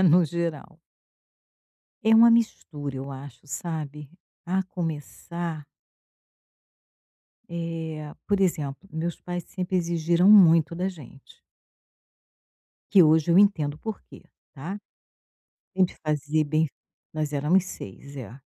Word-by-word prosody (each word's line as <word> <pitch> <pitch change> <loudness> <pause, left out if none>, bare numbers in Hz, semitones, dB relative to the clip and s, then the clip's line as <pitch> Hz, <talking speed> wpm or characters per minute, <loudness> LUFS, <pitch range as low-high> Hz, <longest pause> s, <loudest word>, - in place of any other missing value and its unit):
É - - +4
no 175 0 +6
geral. 170 0 -4 1.2
É 225 0 +5
uma 230 +1 +8
mistura 150 - 0
eu 135 +1 -6
acho, 135 -1 -10
sabe, 150 0 -5 0.4
a 190 +2 +1
começar 170 -1 -5 1.8
Eh, 165 -2 -4 0.2
por 200 -1 +1
exemplo, 160 -3 -1
meus 165 +2 -3
pais 175 -1 -5
sempre 185 0 -2
exigiram 170 +1 +2
muito 170 -6 +7
da 180 +3 -1
gente. 145 -7 -13 1.6
Que 190 - +8
hoje 160 +1 +4
eu 170 - +6
entendo 170 -8 +3
o - - -15
porquê, 220 +2 -8 0.3
tá. 165 +8 -6 1.0
Tem 190 0 +4
que 180 - -5
fazer 155 0 0
bem 155 +2 +1 0.4
nós 155 -1 -3
éramos 150 +6 +2
6, 140 - -10
é. 125 0 -9
165 Hz, 115 wpm, -26 LUFS, 150-180 Hz, 1.8 s, uma